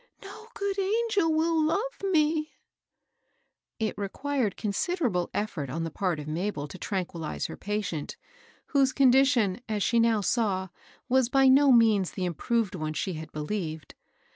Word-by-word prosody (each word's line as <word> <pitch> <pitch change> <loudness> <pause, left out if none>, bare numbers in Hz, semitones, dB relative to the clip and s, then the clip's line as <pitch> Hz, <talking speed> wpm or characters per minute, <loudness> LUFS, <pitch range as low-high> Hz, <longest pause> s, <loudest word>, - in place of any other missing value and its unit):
— - - -20
no 435 +3 -11
good 400 -1 -2
angel 410 -3 +1
will 320 +1 +2
love 410 +11 -1
me 310 -4 +2
I - - -34 0.7
" - - -49
It - - -11
required 245 +2 -2
considerable 215 - -1
effort 175 -10 -3
on 165 +5 -3
the 165 - -4
part 180 -2 -1
of 150 - -7
Mabel 155 -1 -3
to 185 - -10
tranquillize 175 -5 -3
her - - -5
patient, 200 -7 -4 0.5
whose 270 -2 +2
condition, 255 -6 +4
as 210 -2 0
she 235 - +2
now 230 -2 +3
saw, 195 -4 0 0.4
was 260 -1 +3
by 270 0 +4
no 275 +1 +6
means 220 -6 +4
the 185 - -3
improved 210 +5 -1
one 155 -3 -3
she 185 +4 -2
had 160 0 -8
believed. 155 -1 -4
220 Hz, 160 wpm, -27 LUFS, 180-285 Hz, 0.7 s, no